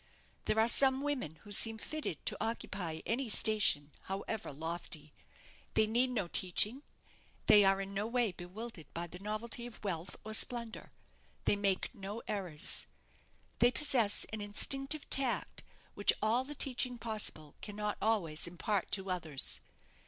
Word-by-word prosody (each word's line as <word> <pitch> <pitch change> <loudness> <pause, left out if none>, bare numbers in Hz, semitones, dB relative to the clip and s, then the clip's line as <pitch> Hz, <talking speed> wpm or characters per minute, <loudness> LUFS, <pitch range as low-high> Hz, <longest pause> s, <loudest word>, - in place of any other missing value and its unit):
There 220 - +1
are 220 - +4
some 265 +2 +5
women 275 - -3
who 205 - -12
seem 225 +2 +4
fitted 305 - -5
to - - +1
occupy 200 -7 -3
any 240 +2 -1
station, 205 -10 +4
however 195 +1 -4
lofty. 160 0 -5 0.6
They 220 - +5
need 240 +4 +3
no 215 -8 -2
teaching; 205 +9 +2 0.6
they 205 -1 +7
are 195 0 +3
in 195 0 -5
no 200 +2 -2
way 235 -2 +1
bewildered 180 -2 -9
by 170 +1 -2
the 175 +1 -11
novelty 220 +4 -4
of 235 - -12
wealth 180 -3 -4
or 215 - -5
splendour; 235 0 0 0.5
they - - +3
make 200 +1 -1
no 205 0 -7
errors. 180 -8 0 0.7
They 240 - +6
possess 245 -5 +2
an 215 - -4
instinctive 270 +8 0
tact, 265 -3 +1 0.3
which - - +5
all 230 +4 +2
the 295 +2 -7
teaching 255 -2 +1
possible 210 -10 -3
cannot 210 0 -4
always 180 -9 0
impart 180 +3 -2
to 190 -1 0
others. 160 -6 +3
210 Hz, 145 wpm, -33 LUFS, 180-235 Hz, 0.7 s, they